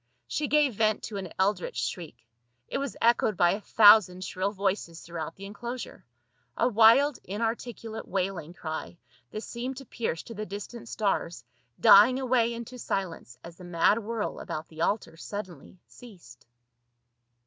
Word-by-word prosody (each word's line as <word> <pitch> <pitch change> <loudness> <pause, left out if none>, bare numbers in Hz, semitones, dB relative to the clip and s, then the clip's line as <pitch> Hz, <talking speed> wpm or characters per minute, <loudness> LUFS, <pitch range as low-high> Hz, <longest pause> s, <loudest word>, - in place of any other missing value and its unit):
She 295 - -2
gave 295 -3 +3
vent 215 0 +1
to 210 - -5
an 185 -4 -6
eldritch 190 -1 0
shriek; 150 -11 -5 0.4
it - - -3
was 280 -3 -4
echoed 230 -3 +3
by 175 0 +4
a 205 - -3
thousand 205 -4 +6
shrill 185 +2 -2
voices 195 -4 -2
throughout 165 -1 -6
the 195 - -10
enclosure, 235 +5 -7 0.5
a - - +3
wild 240 +5 +5
inarticulate 225 +2 -4
wailing 180 -3 -3
cry 160 +1 -6 0.3
that 215 - -6
seemed 250 +2 -5
to 270 - -9
pierce 220 -9 -3
to 230 - -9
the 215 0 -6
distant 210 +4 -8
stars, 175 - -2 0.3
dying 220 +6 +7
away 245 -3 +2
into 235 +2 -7
silence 170 - -4
as 170 0 -11
the 180 - -12
mad 175 +5 +2
whirl 225 0 -4
about 155 +1 -6
the 160 0 -9
altar 200 -2 -1
suddenly 185 -3 -8
ceased. 175 - -15
205 Hz, 150 wpm, -28 LUFS, 175-230 Hz, 0.5 s, dying